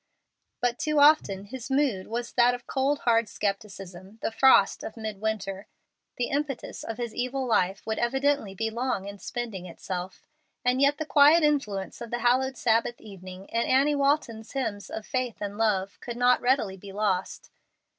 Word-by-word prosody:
But 245 Hz, -1 st, 0 dB
too 305 Hz, -1 st, +1 dB
often 285 Hz, -10 st, +4 dB
his 250 Hz, +4 st, -8 dB
mood 265 Hz, -9 st, +1 dB
was 235 Hz, +1 st, -4 dB
that 245 Hz, 0 st, +4 dB
of 245 Hz, -, -11 dB
cold 275 Hz, +2 st, 0 dB
hard 230 Hz, -2 st, +2 dB
scepticism, 195 Hz, -1 st, -5 dB
the -, -, 0 dB
frost 245 Hz, -4 st, +5 dB
of 220 Hz, -, -7 dB
midwinter. 210 Hz, -2 st, -4 dB, 0.5 s
The 245 Hz, -, -1 dB
impetus 280 Hz, -2 st, -3 dB
of 225 Hz, -, -5 dB
his 235 Hz, -2 st, -4 dB
evil 255 Hz, +2 st, -2 dB
life 195 Hz, -4 st, +1 dB
would 220 Hz, 0 st, -2 dB
evidently 265 Hz, -4 st, 0 dB
be 225 Hz, +3 st, -2 dB
long 235 Hz, -4 st, -2 dB
in 200 Hz, 0 st, -8 dB
spending 225 Hz, -7 st, -5 dB
itself. 180 Hz, +1 st, -6 dB, 0.4 s
And 250 Hz, +2 st, +2 dB
yet 285 Hz, +1 st, +4 dB
the 315 Hz, -, -3 dB
quiet 300 Hz, +2 st, +6 dB
influence 240 Hz, -11 st, -1 dB
of 235 Hz, -, -6 dB
the 240 Hz, -, -2 dB
hallowed 255 Hz, +2 st, +1 dB
Sabbath 230 Hz, +1 st, +1 dB
evening, 190 Hz, -2 st, -11 dB
and 230 Hz, 0 st, 0 dB
Annie 275 Hz, +3 st, +3 dB
Walton's 275 Hz, -6 st, 0 dB
hymns 220 Hz, -7 st, -3 dB
of 220 Hz, -, -6 dB
faith 255 Hz, -3 st, -2 dB
and 205 Hz, -1 st, -4 dB
love, 205 Hz, -3 st, 0 dB
could 240 Hz, -1 st, -7 dB
not 245 Hz, 0 st, +4 dB
readily 245 Hz, -7 st, +1 dB
be 195 Hz, +1 st, -11 dB
lost. 195 Hz, -2 st, -2 dB
230 Hz, 170 wpm, -27 LUFS, 200-265 Hz, 0.5 s, quiet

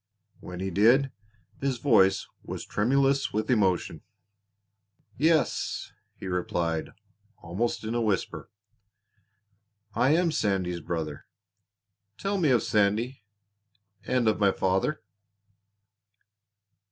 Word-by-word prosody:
When 90 Hz, 0 st, -8 dB
he 95 Hz, 0 st, -2 dB
did 120 Hz, +8 st, +4 dB, 0.5 s
his 135 Hz, -2 st, -1 dB
voice 95 Hz, -7 st, +3 dB, 0.2 s
was -, -, -7 dB
tremulous 135 Hz, +5 st, +1 dB
with 110 Hz, +4 st, -1 dB
emotion. 95 Hz, -7 st, +1 dB, 1.1 s
"Yes," 160 Hz, +3 st, +1 dB, 0.2 s
he -, -, -10 dB
replied 85 Hz, -3 st, -2 dB, 0.5 s
almost 100 Hz, +10 st, -2 dB
in 110 Hz, +1 st, -3 dB
a 120 Hz, -, 0 dB
whisper. 105 Hz, -4 st, -2 dB, 1.4 s
"I 135 Hz, +8 st, +3 dB
am 170 Hz, -1 st, +2 dB
Sandy's 95 Hz, -, -1 dB
brother. 80 Hz, -3 st, -5 dB, 0.9 s
Tell 200 Hz, 0 st, -1 dB
me 160 Hz, -5 st, +3 dB
of 125 Hz, -3 st, +3 dB
Sandy 110 Hz, +5 st, +1 dB, 0.8 s
and 125 Hz, -2 st, +1 dB
of 110 Hz, -, +2 dB
my 100 Hz, -2 st, +4 dB
father." 95 Hz, +11 st, 0 dB
110 Hz, 100 wpm, -27 LUFS, 95-135 Hz, 1.4 s, did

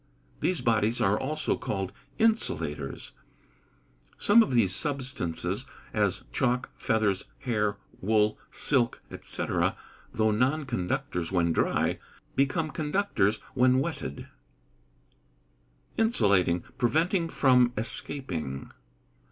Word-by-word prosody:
These 180 Hz, -5 st, 0 dB
bodies 115 Hz, -1 st, +2 dB
are 100 Hz, +2 st, +3 dB
also 155 Hz, +5 st, -1 dB
called 95 Hz, -2 st, -3 dB, 0.2 s
insulators. 80 Hz, -, 0 dB, 1.1 s
Some 235 Hz, -, +6 dB
of -, -, +1 dB
these 95 Hz, -6 st, +4 dB
substances, 135 Hz, -, -2 dB, 0.3 s
as -, -, 0 dB
chalk, 125 Hz, -, 0 dB
feathers, 105 Hz, -4 st, 0 dB, 0.2 s
hair, 105 Hz, -6 st, 0 dB, 0.2 s
wool, 105 Hz, +1 st, +2 dB
silk, 125 Hz, -5 st, 0 dB, 0.2 s
&c., -, -, -3 dB, 0.7 s
though 110 Hz, 0 st, +2 dB
non 130 Hz, +8 st, +1 dB
conductors 90 Hz, -6 st, -2 dB
when 85 Hz, -3 st, +2 dB
dry, -, -, +1 dB, 0.4 s
become 140 Hz, +3 st, +1 dB
conductors 150 Hz, -, 0 dB
when 130 Hz, 0 st, +4 dB
wetted. 135 Hz, -, -3 dB, 1.7 s
Insulating 100 Hz, -, +3 dB, 0.2 s
preventing 165 Hz, -, +2 dB
from 125 Hz, -5 st, +4 dB
escaping. 95 Hz, -, -3 dB
120 Hz, 95 wpm, -28 LUFS, 95-140 Hz, 1.7 s, Some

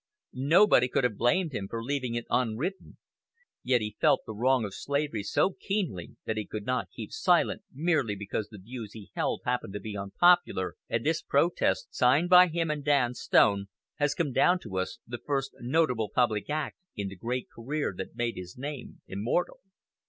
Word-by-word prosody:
Nobody 140 Hz, 0 st, +5 dB
could 125 Hz, -, 0 dB
have 125 Hz, -4 st, +1 dB
blamed 145 Hz, -, +1 dB
him 95 Hz, -5 st, -3 dB
for 115 Hz, 0 st, -4 dB
leaving 130 Hz, -2 st, -2 dB
it 120 Hz, -, -3 dB
unwritten; 125 Hz, -, -1 dB, 0.6 s
yet 125 Hz, -2 st, +2 dB
he 105 Hz, 0 st, -5 dB
felt -, -, +4 dB
the 110 Hz, -, -6 dB
wrong 125 Hz, +2 st, +2 dB
of 100 Hz, -, -6 dB
slavery 140 Hz, -4 st, -2 dB
so 185 Hz, -, +1 dB
keenly 180 Hz, -, -3 dB
that 110 Hz, -, -2 dB
he 105 Hz, -, -2 dB
could 105 Hz, -1 st, -6 dB
not 125 Hz, -7 st, -1 dB
keep -, -, -8 dB
silent -, -, +2 dB
merely 145 Hz, -7 st, 0 dB
because 105 Hz, +1 st, -4 dB
the 105 Hz, -, -11 dB
views 110 Hz, +2 st, -8 dB
he 105 Hz, -4 st, -11 dB
held -, -, -1 dB
happened 95 Hz, -, -1 dB
to 105 Hz, -, -4 dB
be 105 Hz, +1 st, -6 dB
unpopular; 100 Hz, -, +3 dB, 0.2 s
and 115 Hz, -, -1 dB
this 160 Hz, +1 st, +1 dB
protest, 170 Hz, -8 st, +1 dB
signed 140 Hz, +8 st, +3 dB
by 180 Hz, 0 st, +9 dB
him 165 Hz, -1 st, -1 dB
and 150 Hz, -1 st, -3 dB
Dan 140 Hz, -5 st, +2 dB
Stone, 100 Hz, -4 st, +3 dB, 0.3 s
has 145 Hz, -1 st, +1 dB
come 155 Hz, -5 st, -1 dB
down 175 Hz, +8 st, +4 dB
to 95 Hz, -5 st, -4 dB
us, 95 Hz, -, -3 dB
the 120 Hz, 0 st, -6 dB
first 135 Hz, 0 st, -2 dB
notable 125 Hz, -4 st, +1 dB
public 115 Hz, -3 st, +1 dB
act 150 Hz, -1 st, -2 dB, 0.2 s
in 100 Hz, -1 st, -3 dB
the 95 Hz, -, -7 dB
great 120 Hz, +6 st, -3 dB
career 140 Hz, +2 st, -3 dB
that 95 Hz, +4 st, -7 dB
made 120 Hz, -1 st, -2 dB
his 90 Hz, +2 st, -8 dB
name 140 Hz, 0 st, -7 dB
immortal. 110 Hz, -, -1 dB
125 Hz, 185 wpm, -28 LUFS, 105-150 Hz, 0.6 s, by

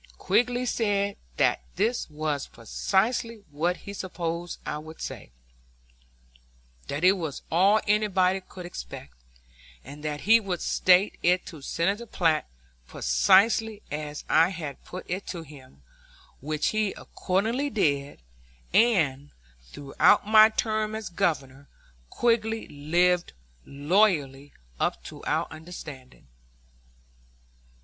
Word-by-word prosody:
Quigg 245 Hz, +1 st, +1 dB
said 205 Hz, -4 st, 0 dB, 0.2 s
that -, -, +2 dB
this 235 Hz, -4 st, 0 dB
was 150 Hz, -2 st, -3 dB
precisely 215 Hz, -, -1 dB
what 170 Hz, +5 st, 0 dB
he 200 Hz, -, -6 dB
supposed 175 Hz, -3 st, -4 dB
I 150 Hz, -, -3 dB
would 160 Hz, +1 st, -11 dB
say, -, -, -7 dB, 1.6 s
that 145 Hz, +4 st, -4 dB
it 185 Hz, -, +7 dB
was 165 Hz, -8 st, -4 dB
all 195 Hz, +6 st, +4 dB
anybody 195 Hz, -3 st, +2 dB
could 185 Hz, -1 st, -11 dB
expect, -, -, -9 dB, 0.7 s
and 145 Hz, +3 st, -11 dB
that 150 Hz, -1 st, -3 dB
he 225 Hz, +3 st, +6 dB
would 190 Hz, -5 st, -3 dB
state 185 Hz, +3 st, +3 dB
it 180 Hz, +1 st, +2 dB
to 155 Hz, -4 st, -10 dB
Senator 195 Hz, +11 st, -1 dB
Platt 160 Hz, -, +1 dB, 0.4 s
precisely 205 Hz, -, +3 dB
as 150 Hz, 0 st, -5 dB
I 165 Hz, +2 st, +4 dB
had 160 Hz, -7 st, -7 dB
put 185 Hz, -, -9 dB
it 185 Hz, +3 st, -4 dB
to 170 Hz, -3 st, -5 dB
him, 130 Hz, -, -16 dB, 0.6 s
which 155 Hz, +2 st, -1 dB
he 215 Hz, -2 st, 0 dB
accordingly 225 Hz, +10 st, -2 dB
did; 140 Hz, -, -1 dB, 0.5 s
and, 150 Hz, -, +3 dB, 0.4 s
throughout 145 Hz, +10 st, +3 dB
my 215 Hz, +1 st, +7 dB
term 215 Hz, -1 st, -1 dB
as 220 Hz, -1 st, -5 dB
Governor, 140 Hz, -5 st, -2 dB, 0.4 s
Quigg 235 Hz, -2 st, +2 dB
lived 180 Hz, -4 st, 0 dB, 0.3 s
loyally 145 Hz, -3 st, +1 dB, 0.3 s
up -, -, -1 dB
to -, -, -10 dB
our -, -, 0 dB
understanding. 155 Hz, -, -10 dB
180 Hz, 115 wpm, -26 LUFS, 150-210 Hz, 1.6 s, it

